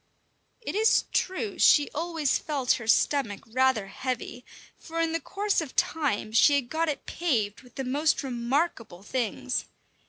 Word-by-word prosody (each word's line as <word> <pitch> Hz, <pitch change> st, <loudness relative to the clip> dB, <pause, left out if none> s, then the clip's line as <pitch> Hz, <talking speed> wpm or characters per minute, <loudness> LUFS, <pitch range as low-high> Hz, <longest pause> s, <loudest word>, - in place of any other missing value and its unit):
It -, -, -4 dB
is 435 Hz, +3 st, +4 dB
true 375 Hz, +3 st, -1 dB
she 290 Hz, -1 st, +6 dB
always 325 Hz, -3 st, 0 dB
felt 275 Hz, -5 st, -1 dB
her 225 Hz, -, -8 dB
stomach 225 Hz, -3 st, +2 dB
rather 255 Hz, -2 st, +1 dB
heavy, 250 Hz, +4 st, -5 dB, 0.3 s
for 330 Hz, 0 st, -7 dB
in 330 Hz, -1 st, +1 dB
the 330 Hz, -, -1 dB
course 400 Hz, +5 st, -1 dB
of 300 Hz, -5 st, -8 dB
time 275 Hz, -9 st, 0 dB
she 285 Hz, +6 st, +5 dB
had 265 Hz, -4 st, -1 dB
got 325 Hz, +1 st, 0 dB
it 295 Hz, -, -4 dB
paved 230 Hz, -, -1 dB
with 250 Hz, -3 st, -19 dB
the 270 Hz, -, -3 dB
most 290 Hz, +5 st, +1 dB
remarkable 240 Hz, -, -2 dB
things. 250 Hz, +2 st, -2 dB
275 Hz, 155 wpm, -27 LUFS, 240-325 Hz, 0.3 s, she